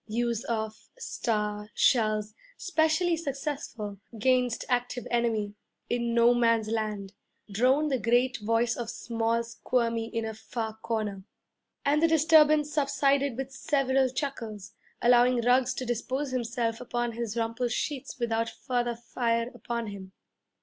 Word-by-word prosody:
'Use 235 +1 -1
of 220 -3 -4
star 210 - -2
shells 215 -3 +2 0.2
specially 335 -1 +2
successful 275 - -4 0.2
'gainst 250 +1 +2
active 245 -1 -1
enemy 225 -4 0 0.4
in 235 -1 0
No 235 +1 +6
Man's 230 -2 +2
Land,' 210 -3 -2 0.4
droned 260 +8 +3
the 260 - +1
great 245 +3 +2
voice 230 +2 +1
of 235 -2 -4
small 230 0 -1
Squirmy 230 0 -1
in 230 0 -3
a 220 - -4
far 220 0 -5
corner. 215 -4 -3 0.6
And 290 +2 +3
the 330 - +5
disturbance 305 -2 +5
subsided 280 -2 +2
with 270 0 -4
several 270 -1 +1
chuckles, 230 -7 -5 0.3
allowing 245 0 +5
Ruggs 250 +1 +3
to 255 - -4
dispose 255 +4 -2
himself 235 -2 -1
upon 240 -1 -2
his 230 -1 -4
rumpled 230 +1 -1
sheets 270 +1 -3
without 230 -1 0
further 240 -1 -2
fire 235 0 -1
upon 235 -1 -4
him. 195 -2 -8
235 Hz, 130 wpm, -28 LUFS, 225-260 Hz, 0.6 s, No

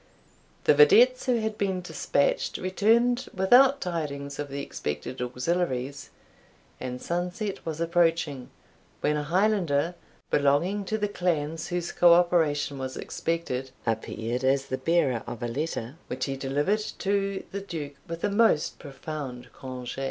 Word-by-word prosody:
The - - +6
videttes 235 - +6
who 240 -3 +2
had 220 -1 -3
been 190 -2 0
despatched - - 0
returned 230 +7 +2
without 255 +8 +6
tidings 145 -5 -4
of 145 -1 -3
the 140 +1 -4
expected 75 - -5
auxiliaries, 130 +1 -2 0.7
and 125 0 -5
sunset 180 - -3
was 160 -1 -3
approaching, 165 -5 +1 0.5
when 150 - +2
a 150 - 0
Highlander 175 -2 +1 0.4
belonging 165 +9 +2
to 220 - -1
the 210 -1 0
clans 165 -5 -1
whose 175 -1 -2
co 175 -1 +6
operation 160 -5 +2
was 130 0 -5
expected, 150 -6 -3 0.2
appeared 115 +2 -2
as 135 +1 +2
the 130 - -3
bearer 155 -9 +2
of 120 0 -6
a - - 0
letter, 135 0 -3
which 130 +1 -3
he 135 - -3
delivered 145 +10 0 0.2
to 195 0 -1
the 200 - -4
Duke 160 -7 -6
with 165 0 -6
a 205 - +1
most 205 -7 +2
profound 140 -3 -7
conge'. 130 -1 -7
165 Hz, 140 wpm, -27 LUFS, 135-190 Hz, 0.7 s, The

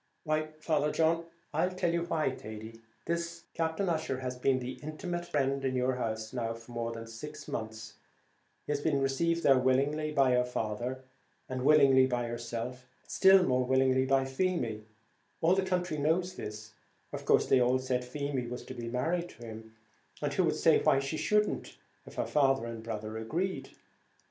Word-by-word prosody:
"Why, 155 -1 0
Father 150 -2 +1
John?" 165 +1 +2 0.3
"I'll 165 +4 +2
tell 180 -2 -1
you 170 0 0
why, 160 -5 0
Thady: 110 -1 -9 0.2
this 170 0 -3
Captain 165 +4 -1
Ussher 155 -6 -1
has 125 -1 -3
been 130 +1 +2
the 125 0 -5
intimate 175 +3 -4
friend 135 -2 0
in 130 -1 0
your 125 0 +1
house 110 -2 -3
now 115 -2 -2
for 115 +1 -13
more 115 -1 -2
than 115 0 -7
six 130 +7 -9
months 110 -1 -5
back; - - -26 0.7
he - - -3
has 145 -1 0
been 145 -2 +1
received 165 +5 +1
there 135 -2 +6
willingly 140 +4 +1
by 135 -3 +4
your 125 0 +4
father, 125 +2 -3 0.4
and 130 -1 -3
willingly 135 -3 +6
by 120 -2 -1
yourself, 120 +2 -5 0.2
but - - -14
still 190 -1 +7
more 130 -5 +2
willingly 130 0 +3
by 135 0 +3
Feemy; 130 -7 -1 0.5
all 165 +2 +4
the 195 - +3
country 180 -4 -1
knows 175 +5 +1
this; 105 -7 -7 0.4
of - - -5
course - - +4
they 130 - +4
all 125 +1 +3
said 130 -1 -1
Feemy 135 -1 -3
was 125 +1 -6
to - - -7
be 120 -2 -6
married 165 +8 -1
to 120 - -12
him; 110 0 -10 0.4
and 145 -1 -2
who 180 +5 +2
could 160 - +1
say 160 - +4
why 150 -3 +4
she 135 +3 -2
shouldn't, 210 +5 0 0.3
if - - -11
her - - -1
father 135 -4 +2
and 115 -1 -6
brother 110 -1 -5
agreed? 175 +12 -2
135 Hz, 185 wpm, -31 LUFS, 120-160 Hz, 0.7 s, still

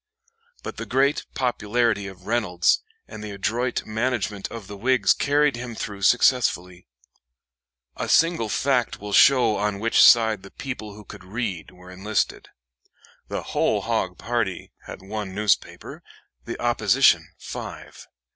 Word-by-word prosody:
But - - -7
the - - -6
great 135 +2 +1
popularity 115 -4 0
of 95 -2 -12
Reynolds 105 -6 +1 0.3
and 105 - -9
the 105 - -6
adroit 115 +5 -2
management 110 -3 -2
of 115 -3 -8
the 100 - -9
Whigs 115 -1 +3
carried 145 0 +2
him 120 -1 -7
through 100 -2 -6
successfully. 95 -6 +2 1.1
A - - -4
single 165 -9 +3
fact 130 +1 0
will 105 0 -7
show 125 -4 +5
on 105 -1 -1
which 115 +2 +3
side 110 -4 +6
the 95 - -12
people 110 -6 -7
who 105 0 -13
could 95 - -12
read 100 -3 -4
were 90 0 -15
enlisted. 100 +3 -2 0.8
The - - -4
"whole - - +1
hog" - - -2
party 115 -6 -3 0.2
had - - -9
one 100 -1 -6
newspaper, 105 -2 -1 0.4
the - - -6
opposition - - +3
five. - - -9
110 Hz, 135 wpm, -24 LUFS, 100-120 Hz, 1.1 s, side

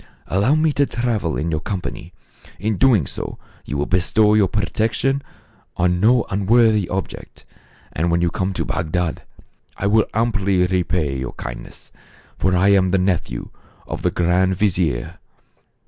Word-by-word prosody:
Allow 105 +10 +2
me 155 0 +2
to 140 -1 +2
travel 115 -9 -1
in 80 +2 -2
your 80 - 0
company. 90 -2 -5 0.5
In 105 +4 -1
so 95 - -6
doing 115 - +4 0.6
you 70 - -4
will 70 - 0
bestow 105 +4 +2
your 105 -2 +4
protection 115 +7 0 0.6
on 90 0 +1
no 115 +4 +4
unworthy 105 0 +3
object, 95 0 -6 0.5
and 85 +3 0
when 85 0 +2
you 85 -1 +1
come 95 0 -1
to - - -2
Bagdad 85 0 -2 0.6
I - - -3
will 105 +2 +3
amply 100 -5 +1
repay 90 -6 -1
your 65 - -5
kindness; - - -9 0.5
for 95 -1 +2
I 95 +3 +3
am 95 -2 +4
the 95 - +2
nephew 90 -10 -1 0.3
of - - -6
the - - +1
grand 90 +2 +1
vizier." 85 - -1
95 Hz, 150 wpm, -20 LUFS, 85-110 Hz, 0.6 s, doing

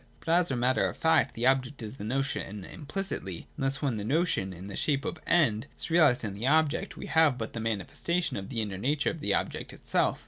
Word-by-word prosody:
But, - - -8
as 175 +1 +4
a 135 - 0
matter 125 +2 +2
of - - -9
fact, 160 -3 +3
the 115 - -1
object 130 -1 +2
is 110 +4 -7
the - - -7
notion 110 -4 -2
implicitly: 145 - -5
and - - -4
thus 135 +2 0
when 130 -6 0
the 105 - -3
notion, 135 - +1
in 90 +1 -9
the 100 - -7
shape 140 -3 0
of - - -3
End, 135 -8 +3
is - - -6
realised 155 -8 +5
in 105 -3 -3
the 105 +6 -3
object, 155 +1 +2
we - - -6
have 160 -5 +4
but 115 -2 -5
the 115 - -4
manifestation 115 - -1
of 95 -1 -5
the 115 -4 -1
inner 95 -3 -5
nature 145 +7 +1
of 165 - -8
the 100 -7 +1
object - - -3
itself. - - 0
130 Hz, 235 wpm, -29 LUFS, 105-155 Hz, -, realised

